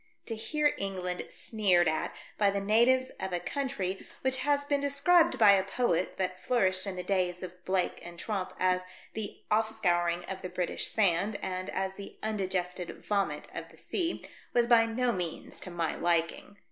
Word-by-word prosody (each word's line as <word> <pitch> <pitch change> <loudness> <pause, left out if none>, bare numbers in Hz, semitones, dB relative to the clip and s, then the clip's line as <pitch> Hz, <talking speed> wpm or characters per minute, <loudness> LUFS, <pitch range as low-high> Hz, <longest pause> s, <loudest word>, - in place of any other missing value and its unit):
To 225 - -3
hear 295 +7 +1
England 185 -2 -2
sneered 190 -6 +2
at 155 0 0 0.2
by 205 -1 +3
the 200 0 0
natives 240 +6 +3
of 190 -1 -3
a 175 - +1
country 200 -8 -3
which 260 0 +1
has 285 +2 +1
been 285 -1 +1
described 315 +5 +4
by 210 -3 +8
a 195 -1 +4
poet 195 -3 0
that 185 -1 -2
flourished 190 -4 +1
in 195 - -3
the 180 - -4
days 180 -1 0
of 180 0 -9
Blake 185 -1 0
and 175 0 -9
Tromp 195 0 -3
as 185 0 +3 0.3
the 215 -2 -6
"off 220 +1 +3
scouring 175 -5 +1
of 190 0 -6
the 185 - -5
British 180 -1 -2
sand," 200 0 +2
and 185 0 -3
as 190 0 -2
the 200 - -9
" - - -29
undigested 185 -4 -2
vomit 195 -8 0
of - - -6
the - - -18
sea," 345 -3 -2 0.3
was 240 -1 +5
by 235 -1 +5
no 245 +2 +1
means 175 -6 -4
to - - -7
my 170 -2 -1
liking. 170 +4 0
195 Hz, 185 wpm, -30 LUFS, 180-225 Hz, 0.3 s, by